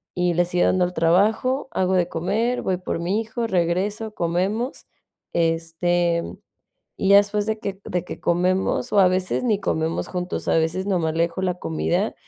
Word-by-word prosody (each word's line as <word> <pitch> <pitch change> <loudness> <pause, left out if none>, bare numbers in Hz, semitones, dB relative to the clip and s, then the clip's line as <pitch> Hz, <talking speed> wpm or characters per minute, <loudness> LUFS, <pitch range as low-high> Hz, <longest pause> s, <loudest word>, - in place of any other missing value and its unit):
y 180 -1 +1
le 175 +1 +3
sigo 175 0 +1
dando 185 -1 +3
al 180 - -5
trabajo, 215 +12 +2
hago 185 0 +1
de 180 -2 +2
comer, 215 +9 -1
voy 185 -1 -1
por 180 -2 -4
mi 185 +5 0
hijo, 225 +1 -3
regreso, 200 +3 -1
comemos, 190 +9 -1 0.5
este, 170 +1 +1 0.7
y 195 - -1
ya 200 - +9
después 205 +1 +1
de 220 0 0
que 195 -2 -5
de 180 0 -2
que - - -7
comemos, 180 -5 0
o 200 - +5
a 185 - +7
veces 185 +5 0
ni 215 -5 +1
comemos 160 -4 -1
juntos, 180 -1 -4
a - - +3
veces 170 +4 -1
nomás 170 -5 0
le 165 - +3
dejo 170 +2 -3
la 180 -2 0
comida, 80 - -1
180 Hz, 180 wpm, -23 LUFS, 170-200 Hz, 0.7 s, ya